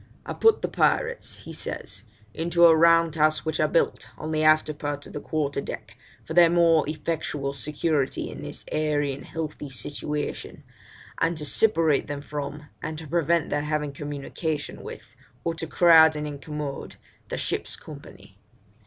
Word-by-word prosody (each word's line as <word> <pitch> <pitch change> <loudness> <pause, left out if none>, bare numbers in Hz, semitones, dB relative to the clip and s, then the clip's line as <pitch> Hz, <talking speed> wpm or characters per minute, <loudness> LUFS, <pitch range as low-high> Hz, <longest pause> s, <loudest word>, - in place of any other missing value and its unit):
'I - - -4
put 450 -1 +3
the - - +2
pirates,' 485 -1 0
he - - -7
says, - - -5 0.3
'into 170 +1 +3
a 165 -1 +8
round 165 0 +5
house 155 0 +2
which 160 -1 -1
I 155 - +3
built 165 - 0
on 155 +1 -5
the 155 0 0
after 155 0 +4
part 145 -1 -4
of - - -12
the - - -4
quarter 145 -2 -2
deck, - - -7 0.3
for 160 - -5
their 170 0 +7
more 165 -3 +4
effectual 150 -3 -3
security 145 0 -1
in - - -8
this - - -6
airy 150 -2 0
and 135 - -9
healthy 150 -2 -5
situation, 145 +4 -4 0.6
and 165 0 +1
to 150 - -3
separate 165 -4 +2
them 145 -1 -4
from, 145 0 -5 0.2
and 155 0 -4
to 160 - -8
prevent 170 +1 +1
their 145 - +1
having 150 -1 -1
communication 145 +2 -4
with, - - -10 0.3
or 165 - 0
to 165 0 -5
crowd 160 -1 +6
and 150 0 -3
incommode, 150 -1 -6 0.3
the - - -3
ship's - - -2
company.' - - -13
155 Hz, 165 wpm, -25 LUFS, 145-165 Hz, 0.6 s, a